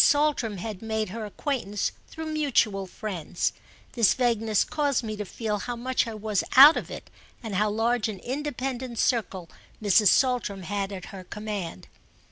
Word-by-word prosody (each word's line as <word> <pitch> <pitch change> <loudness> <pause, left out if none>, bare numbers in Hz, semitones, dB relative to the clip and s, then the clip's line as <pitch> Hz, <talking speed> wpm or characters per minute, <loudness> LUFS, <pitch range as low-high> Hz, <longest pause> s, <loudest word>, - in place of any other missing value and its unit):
Saltram 290 -8 +2
had 205 +1 -6
made 220 -2 -2
her 220 +2 -5
acquaintance 210 -3 -2 0.2
through 320 0 -7
mutual 265 -11 +1
friends. 180 -4 -3 0.4
This 230 -4 +3
vagueness 225 -4 +2
caused 285 -4 0
me 215 -1 -4
to 210 0 -5
feel 210 +2 -3
how 245 +4 -4
much 250 +1 0
I 225 - -5
was 215 -2 -1
out 285 +5 +11
of - - -4
it - - -9 0.3
and 220 -3 -5
how 210 +3 +2
large 225 +1 +1
an 210 - -5
independent 260 0 -4
circle 200 -8 0 0.3
Mrs. 210 0 +4
Saltram 235 -4 +2
had 200 +2 -2
at 185 -2 -7
her 190 -1 -8
command. 205 - -6
220 Hz, 160 wpm, -26 LUFS, 200-250 Hz, 0.4 s, out